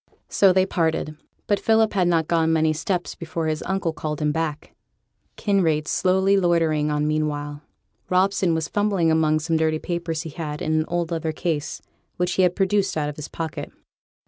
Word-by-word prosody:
So 195 Hz, -2 st, +5 dB
they 185 Hz, 0 st, +3 dB
parted; 160 Hz, -4 st, -1 dB, 0.3 s
but 205 Hz, -, +1 dB
Philip 220 Hz, -1 st, +3 dB
had 185 Hz, -3 st, +2 dB
not 165 Hz, -2 st, +2 dB
gone 165 Hz, -1 st, +2 dB
many 160 Hz, -1 st, +2 dB
steps 175 Hz, +3 st, -2 dB
before 165 Hz, -1 st, -4 dB
his 155 Hz, -1 st, -1 dB
uncle 190 Hz, -3 st, -1 dB
called 150 Hz, -1 st, -4 dB
him 150 Hz, -1 st, +1 dB
back, 155 Hz, -1 st, -3 dB, 0.6 s
Kinraid 165 Hz, -7 st, +1 dB
slowly 190 Hz, +1 st, +2 dB
loitering 165 Hz, -4 st, +2 dB
on 150 Hz, 0 st, 0 dB
meanwhile. 145 Hz, -1 st, -2 dB, 0.5 s
Robson 185 Hz, -2 st, +2 dB
was 160 Hz, -1 st, -1 dB
fumbling 200 Hz, -6 st, +1 dB
among 155 Hz, -1 st, +2 dB
some 165 Hz, +1 st, 0 dB
dirty 160 Hz, 0 st, +1 dB
papers 170 Hz, -1 st, -3 dB
he 160 Hz, -, -7 dB
had 150 Hz, -1 st, -5 dB
in 155 Hz, -, -1 dB
an 155 Hz, 0 st, +2 dB
old 175 Hz, -1 st, -2 dB
leather 160 Hz, -1 st, -1 dB
case, 160 Hz, -1 st, -3 dB, 0.3 s
which 180 Hz, 0 st, 0 dB
he 190 Hz, -, +2 dB
had 180 Hz, -1 st, +3 dB
produced 195 Hz, -2 st, +1 dB
out 150 Hz, -1 st, 0 dB
of 150 Hz, -, -7 dB
his 150 Hz, 0 st, -7 dB
pocket. 160 Hz, -2 st, -5 dB
165 Hz, 180 wpm, -23 LUFS, 155-180 Hz, 0.6 s, So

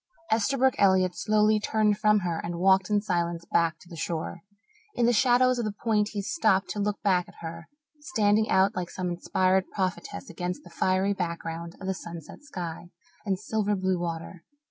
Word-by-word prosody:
Esterbrook 260 Hz, +4 st, +3 dB
Elliott 185 Hz, -2 st, +4 dB
slowly 215 Hz, +1 st, +3 dB
turned 210 Hz, 0 st, +2 dB
from 210 Hz, 0 st, +3 dB
her 170 Hz, -2 st, -2 dB
and 170 Hz, 0 st, -4 dB
walked 190 Hz, +1 st, +4 dB
in 205 Hz, -1 st, +2 dB
silence 170 Hz, -3 st, -1 dB
back 165 Hz, -2 st, +1 dB
to 175 Hz, -, -19 dB
the 175 Hz, -, -10 dB
shore. 165 Hz, +2 st, -4 dB, 0.5 s
In 240 Hz, -, +2 dB
the 240 Hz, -, +4 dB
shadows 250 Hz, +1 st, +4 dB
of 235 Hz, -, -1 dB
the 215 Hz, -, -1 dB
point 210 Hz, 0 st, 0 dB
he 200 Hz, -1 st, -3 dB
stopped 195 Hz, -, +1 dB
to 210 Hz, -, -4 dB
look 205 Hz, 0 st, -1 dB
back 185 Hz, -3 st, +2 dB
at -, -, -16 dB
her, 165 Hz, 0 st, -7 dB, 0.3 s
standing 220 Hz, -8 st, +1 dB
out 190 Hz, +2 st, +3 dB
like 180 Hz, -1 st, -3 dB
some 180 Hz, -1 st, -3 dB
inspired 185 Hz, +2 st, +1 dB
prophetess 185 Hz, -3 st, -3 dB
against 180 Hz, +1 st, -4 dB
the 175 Hz, -, -14 dB
fiery 190 Hz, +3 st, +1 dB
background 170 Hz, -2 st, -4 dB
of 190 Hz, -, -8 dB
the 190 Hz, -, 0 dB
sunset 170 Hz, -, -9 dB
sky 175 Hz, -, -6 dB, 0.4 s
and 190 Hz, -1 st, +1 dB
silver 210 Hz, 0 st, -1 dB
blue 185 Hz, -1 st, 0 dB
water. 170 Hz, 0 st, -5 dB
190 Hz, 185 wpm, -27 LUFS, 175-210 Hz, 0.5 s, Elliott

